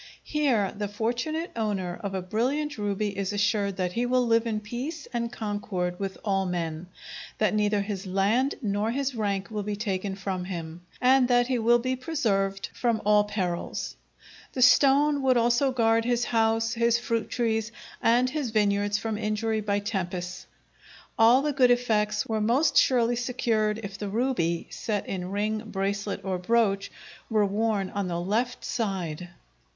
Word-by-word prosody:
Here 260 Hz, -10 st, +1 dB
the 205 Hz, 0 st, -3 dB
fortunate 240 Hz, -, -2 dB
owner 195 Hz, -6 st, -2 dB
of 200 Hz, -1 st, -3 dB
a 185 Hz, -, -2 dB
brilliant 260 Hz, +8 st, -1 dB
ruby 205 Hz, 0 st, -1 dB
is 195 Hz, 0 st, -2 dB
assured 205 Hz, -2 st, 0 dB
that 180 Hz, -1 st, -1 dB
he 240 Hz, +1 st, 0 dB
will 250 Hz, 0 st, +2 dB
live 230 Hz, 0 st, +2 dB
in 215 Hz, -2 st, -1 dB
peace 255 Hz, +8 st, -6 dB
and 235 Hz, -1 st, -2 dB
concord 205 Hz, -5 st, -3 dB
with 195 Hz, -1 st, -4 dB
all 195 Hz, -2 st, +1 dB
men, 170 Hz, -1 st, -3 dB, 0.5 s
that 215 Hz, -, +2 dB
neither 210 Hz, -1 st, +2 dB
his 200 Hz, -1 st, -4 dB
land 205 Hz, +9 st, +1 dB
nor 205 Hz, +1 st, 0 dB
his 275 Hz, +2 st, -1 dB
rank 200 Hz, -3 st, -2 dB
will 210 Hz, -1 st, -2 dB
be 205 Hz, 0 st, -3 dB
taken 195 Hz, -2 st, -2 dB
from 190 Hz, -2 st, -4 dB
him, 170 Hz, -2 st, -6 dB, 0.2 s
and 255 Hz, 0 st, +5 dB
that 245 Hz, -1 st, +4 dB
he 255 Hz, -1 st, 0 dB
will 235 Hz, +2 st, +5 dB
be 255 Hz, +2 st, -1 dB
preserved 210 Hz, -9 st, -1 dB
from 235 Hz, -3 st, 0 dB
all 210 Hz, 0 st, +5 dB
perils. 185 Hz, -5 st, -3 dB, 0.6 s
The 255 Hz, -, +2 dB
stone 280 Hz, +3 st, +5 dB
would 260 Hz, -2 st, +3 dB
also 240 Hz, +3 st, +3 dB
guard 230 Hz, -2 st, +2 dB
his 240 Hz, 0 st, +1 dB
house, 225 Hz, 0 st, +1 dB
his 235 Hz, 0 st, +2 dB
fruit 230 Hz, -2 st, -2 dB
trees, 225 Hz, -2 st, -1 dB, 0.3 s
and 240 Hz, +2 st, +4 dB
his 275 Hz, -1 st, -2 dB
vineyards 205 Hz, -1 st, +1 dB
from 220 Hz, -1 st, -3 dB
injury 215 Hz, 0 st, -1 dB
by 200 Hz, -1 st, 0 dB
tempests. 185 Hz, -3 st, -4 dB, 0.7 s
All 235 Hz, +4 st, +5 dB
the 295 Hz, -1 st, 0 dB
good 255 Hz, -2 st, +4 dB
effects 225 Hz, -4 st, +1 dB
were 220 Hz, -1 st, -1 dB
most 245 Hz, +9 st, +2 dB
surely 240 Hz, -2 st, +4 dB
secured 225 Hz, -3 st, 0 dB
if 200 Hz, 0 st, -7 dB
the 205 Hz, -, -3 dB
ruby, 195 Hz, -7 st, 0 dB
set 210 Hz, -3 st, -3 dB
in 180 Hz, -1 st, -4 dB
ring, 210 Hz, +2 st, -1 dB
bracelet, 200 Hz, 0 st, -3 dB
or 185 Hz, -1 st, -1 dB
brooch, 200 Hz, 0 st, +1 dB, 0.4 s
were 215 Hz, -2 st, +3 dB
worn 205 Hz, -1 st, 0 dB
on 200 Hz, -2 st, -2 dB
the 170 Hz, -1 st, -2 dB
left 225 Hz, +8 st, -1 dB
side. 180 Hz, -6 st, -3 dB
215 Hz, 165 wpm, -27 LUFS, 195-240 Hz, 0.7 s, and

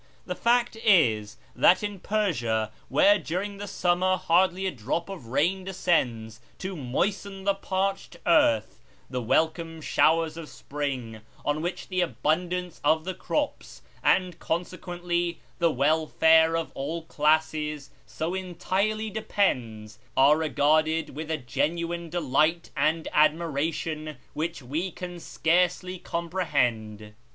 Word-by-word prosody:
The 180 Hz, -, -3 dB
fact 235 Hz, +4 st, +2 dB
is, 115 Hz, -, +3 dB, 0.2 s
that 185 Hz, +3 st, +5 dB
in 205 Hz, -2 st, -4 dB
Persia, 120 Hz, -, 0 dB, 0.2 s
where 305 Hz, +1 st, +5 dB
during 200 Hz, +5 st, -3 dB
the 205 Hz, -, -5 dB
summer 185 Hz, 0 st, +1 dB
hardly 185 Hz, +1 st, +2 dB
a 190 Hz, -, 0 dB
drop 140 Hz, -, -3 dB
of 180 Hz, -12 st, -8 dB
rain 170 Hz, +10 st, +1 dB
descends 125 Hz, -, -1 dB, 0.2 s
to 190 Hz, 0 st, -5 dB
moisten 190 Hz, +8 st, -2 dB
the 200 Hz, 0 st, +3 dB
parched 195 Hz, 0 st, -2 dB
earth, 110 Hz, -, +3 dB, 0.3 s
the 125 Hz, -1 st, -2 dB
welcome 160 Hz, +6 st, 0 dB
showers 160 Hz, +1 st, +2 dB
of 165 Hz, -2 st, -7 dB
spring, 130 Hz, -6 st, -5 dB, 0.2 s
on 145 Hz, +1 st, 0 dB
which 175 Hz, +2 st, -4 dB
the 185 Hz, -1 st, 0 dB
abundance 180 Hz, +1 st, -1 dB
of 155 Hz, +2 st, +2 dB
the 185 Hz, -, -2 dB
crops, 290 Hz, -, -3 dB, 0.2 s
and 180 Hz, -3 st, +2 dB
consequently 175 Hz, 0 st, -2 dB, 0.2 s
the 170 Hz, -1 st, +4 dB
welfare 160 Hz, +3 st, +4 dB
of 165 Hz, -, -3 dB
all 160 Hz, +5 st, -4 dB
classes, 150 Hz, -1 st, 0 dB, 0.2 s
so 160 Hz, +3 st, -3 dB
entirely 190 Hz, +4 st, -1 dB
depends, 115 Hz, -, -1 dB, 0.2 s
are 140 Hz, +3 st, +6 dB
regarded 155 Hz, +1 st, +1 dB
with 155 Hz, +1 st, -6 dB
a 160 Hz, -, 0 dB
genuine 170 Hz, +6 st, -2 dB
delight 165 Hz, +1 st, +1 dB
and 155 Hz, +3 st, +1 dB
admiration 155 Hz, 0 st, 0 dB, 0.2 s
which 160 Hz, -1 st, -3 dB
we 155 Hz, +9 st, -2 dB
can 180 Hz, 0 st, -7 dB
scarcely 180 Hz, +2 st, 0 dB
comprehend. 125 Hz, -, -2 dB
165 Hz, 125 wpm, -26 LUFS, 150-185 Hz, 0.3 s, are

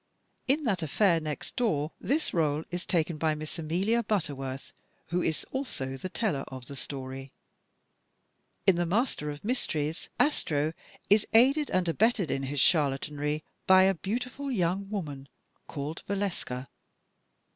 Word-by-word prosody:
In 290 Hz, +4 st, +3 dB
"That 200 Hz, -9 st, +1 dB
Affair 165 Hz, +3 st, +3 dB
Next 155 Hz, -2 st, -5 dB
Door" 165 Hz, -, +1 dB
this 300 Hz, +5 st, +1 dB
r61e 155 Hz, -2 st, +1 dB
is 175 Hz, 0 st, -4 dB
taken 165 Hz, -2 st, +1 dB
by 155 Hz, -1 st, +2 dB
Miss 155 Hz, +3 st, -5 dB
Amelia 185 Hz, +9 st, +1 dB
Butterworth, 140 Hz, -10 st, -2 dB, 0.4 s
who 175 Hz, +1 st, +1 dB
is 160 Hz, -2 st, -1 dB
also 135 Hz, -, -3 dB
the 185 Hz, +8 st, -5 dB
teller 175 Hz, -10 st, 0 dB
of 130 Hz, -2 st, -8 dB
the 140 Hz, -, -8 dB
story. 135 Hz, -1 st, -6 dB, 1.3 s
In 190 Hz, -3 st, +5 dB
"The 175 Hz, 0 st, +1 dB
Master 200 Hz, -, 0 dB
of 145 Hz, 0 st, -7 dB
Mysteries," 160 Hz, -, -1 dB
Astro 155 Hz, -, +2 dB, 0.4 s
is 210 Hz, +1 st, +5 dB
aided 275 Hz, +6 st, +5 dB
and 185 Hz, -1 st, +1 dB
abetted 200 Hz, -, +2 dB
in 135 Hz, -, 0 dB
his 135 Hz, +1 st, -2 dB
charlatanry 150 Hz, 0 st, +2 dB, 0.2 s
by 190 Hz, 0 st, +8 dB
a 195 Hz, +1 st, +5 dB
beautiful 250 Hz, -, -3 dB
young 195 Hz, -2 st, 0 dB
woman 145 Hz, -9 st, -5 dB, 0.4 s
called 150 Hz, +2 st, -5 dB
Valeska. 185 Hz, -10 st, -2 dB
165 Hz, 140 wpm, -29 LUFS, 145-205 Hz, 1.3 s, by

